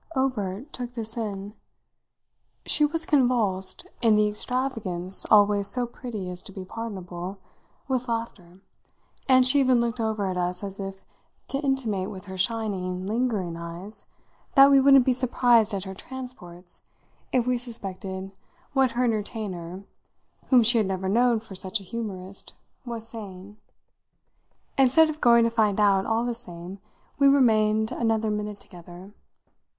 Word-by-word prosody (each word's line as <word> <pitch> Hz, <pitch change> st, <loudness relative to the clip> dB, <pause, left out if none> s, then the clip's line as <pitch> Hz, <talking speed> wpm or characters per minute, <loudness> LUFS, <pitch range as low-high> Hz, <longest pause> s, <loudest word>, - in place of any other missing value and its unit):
Obert 255 Hz, -1 st, -2 dB
took 245 Hz, -1 st, -6 dB
this 225 Hz, -1 st, -4 dB
in; 205 Hz, -3 st, -5 dB, 1.1 s
she 300 Hz, -, +5 dB
was 325 Hz, +2 st, 0 dB
convulsed, 225 Hz, -9 st, +1 dB, 0.2 s
in 225 Hz, -3 st, +4 dB
the 210 Hz, 0 st, +3 dB
extravagance 210 Hz, -5 st, -1 dB
always 205 Hz, -1 st, +5 dB
so 245 Hz, +3 st, +2 dB
pretty 235 Hz, -5 st, -7 dB
as 180 Hz, 0 st, -7 dB
to -, -, -12 dB
be 190 Hz, -1 st, -8 dB
pardonable, 190 Hz, -4 st, -6 dB, 0.5 s
with 255 Hz, -2 st, -1 dB
laughter, 195 Hz, -6 st, -5 dB, 0.7 s
and 255 Hz, -1 st, +6 dB
she 270 Hz, +3 st, +5 dB
even 255 Hz, -2 st, +4 dB
looked 235 Hz, 0 st, -1 dB
over 220 Hz, -2 st, -1 dB
at 185 Hz, -1 st, -2 dB
us 180 Hz, +1 st, -2 dB
as 195 Hz, 0 st, -6 dB
if 195 Hz, 0 st, -7 dB, 0.4 s
to 275 Hz, -, -1 dB
intimate 240 Hz, -9 st, -1 dB
with 190 Hz, -1 st, -9 dB
her 190 Hz, -1 st, -8 dB
shining, 185 Hz, -3 st, -2 dB
lingering 210 Hz, -5 st, -1 dB
eyes 170 Hz, +5 st, -9 dB, 0.5 s
that 275 Hz, 0 st, +8 dB
we 275 Hz, -, +7 dB
wouldn't 275 Hz, -2 st, +6 dB
be 260 Hz, -, +3 dB
surprised 245 Hz, -3 st, +3 dB
at 195 Hz, -2 st, -3 dB
her 190 Hz, -1 st, -7 dB
transports 190 Hz, -7 st, -9 dB, 0.5 s
if 250 Hz, -2 st, +2 dB
we 250 Hz, 0 st, +1 dB
suspected 195 Hz, -5 st, -5 dB, 0.4 s
what 265 Hz, -3 st, +2 dB
her 245 Hz, +1 st, 0 dB
entertainer, 200 Hz, -5 st, -3 dB, 0.6 s
whom 250 Hz, -3 st, +5 dB
she 235 Hz, +1 st, +4 dB
had 210 Hz, -, +1 dB
never 190 Hz, 0 st, -3 dB
known 235 Hz, +3 st, +3 dB
for 215 Hz, -2 st, -12 dB
such 190 Hz, +3 st, -2 dB
a -, -, -12 dB
humourist, 195 Hz, -3 st, -7 dB, 0.3 s
was 230 Hz, -2 st, -5 dB
saying. 205 Hz, -3 st, -9 dB, 1.2 s
Instead 270 Hz, +5 st, +5 dB
of 310 Hz, -, -11 dB
going 235 Hz, -1 st, +6 dB
to 230 Hz, -, +1 dB
find 215 Hz, -3 st, +1 dB
out, 200 Hz, -2 st, +3 dB
all 225 Hz, +1 st, +1 dB
the 245 Hz, -, -1 dB
same, 190 Hz, -5 st, -9 dB, 0.4 s
we 280 Hz, -, +6 dB
remained 220 Hz, -5 st, +3 dB
another 225 Hz, -2 st, 0 dB
minute 210 Hz, -1 st, -4 dB
together. 175 Hz, +2 st, -13 dB
215 Hz, 150 wpm, -25 LUFS, 190-245 Hz, 1.2 s, that